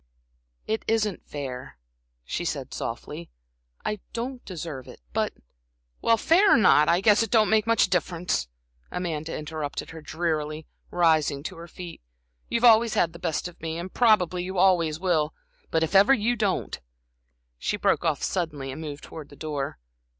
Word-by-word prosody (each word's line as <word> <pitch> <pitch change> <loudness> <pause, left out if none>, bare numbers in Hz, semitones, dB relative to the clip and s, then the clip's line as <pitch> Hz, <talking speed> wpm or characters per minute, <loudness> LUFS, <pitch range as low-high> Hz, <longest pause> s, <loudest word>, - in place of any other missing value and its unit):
"It 220 +1 -2
isn't 215 -4 0
fair," 130 - -6 0.5
she - - -3
said, - - -3
softly. 85 - -5 0.6
"I 210 -1 -1
don't 245 +2 -4
deserve 160 -8 -6
it, - - -12
but" - - +1 0.7
"Well, 230 0 +4
fair 370 - +5
or - - +5
not, 155 -9 +5
I 170 +2 +3
guess 210 +2 +5
it 225 - 0
don't 220 -1 +4
make 220 0 +3
much 230 -3 +4
difference," 175 - 0 0.4
Amanda 165 -3 -3
interrupted 155 -1 -5
her, 165 -1 -9
drearily, 155 -1 -2 0.2
rising 155 -5 +2
to 175 +2 -6
her 170 +1 -9
feet. 175 0 -9 0.5
"You've 235 0 0
always 230 -1 +6
had 165 -1 +2
the 170 - -10
best 165 -1 -2
of 175 - -14
me, 160 0 -3
and 175 +2 -6
probably, 185 -7 +3
you 190 +1 -5
always 170 -4 +3
will. 160 -5 +1 0.3
But, 160 0 +1
if 160 - -2
ever 200 +8 +7
you 235 +2 +1
don't" 205 -5 -1 0.8
She - - -1
broke - - +2
off - - 0
suddenly 150 -7 -2
and 145 - -7
moved 145 -2 -7
towards 155 -3 -9
the 145 - -13
door. 145 -2 -4
170 Hz, 165 wpm, -26 LUFS, 155-210 Hz, 0.8 s, ever